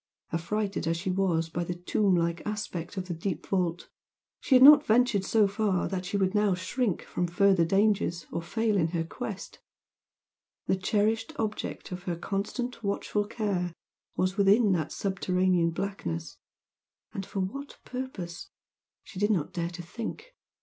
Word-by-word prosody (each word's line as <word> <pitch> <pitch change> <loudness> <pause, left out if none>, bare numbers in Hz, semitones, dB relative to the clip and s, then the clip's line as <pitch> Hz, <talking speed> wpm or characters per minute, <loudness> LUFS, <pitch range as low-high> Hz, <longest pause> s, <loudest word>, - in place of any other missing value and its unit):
Affrighted 195 +2 -1
as 165 0 +1
she 185 +2 -2
was 180 -4 +1
by 175 +1 -3
the 175 +1 -4
tomb 185 +2 +1
like 170 0 0
aspect 205 -4 -4
of 185 -1 -3
the 175 - -2
deep 165 0 -3
vault, 180 -3 -1 0.5
she 265 - +3
had 255 - +8
not 295 +1 +10
ventured 230 -5 +3
so 215 +1 +3
far 200 -2 0
that 185 -1 -3
she 200 - -1
should 190 -1 +1
now 210 -3 +3
shrink 195 +2 -1
from 180 - -2
further 190 0 +4
dangers 195 -2 +2
or 170 - -2
fail 215 +4 0
in 165 -4 +3
her 165 - 0
quest; 200 +3 -7 1.1
the - - +2
cherished 215 +4 0
object 215 -2 -3
of 180 0 -5
her 175 - -1
constant 215 +7 -3
watchful 205 +1 -1
care 195 -6 -2 0.4
was 185 +2 0
within 200 +2 +5
that 165 -5 0
subterranean 185 -3 +1
blackness, 90 - -4 0.8
for 195 0 -4
what 275 +10 -5
purpose? 230 -10 -6 0.5
she 185 - -9
did 205 +1 +2
not 180 -9 0
dare 170 -1 -2
to 175 0 -8
think! 240 - -7
195 Hz, 155 wpm, -28 LUFS, 175-210 Hz, 1.1 s, not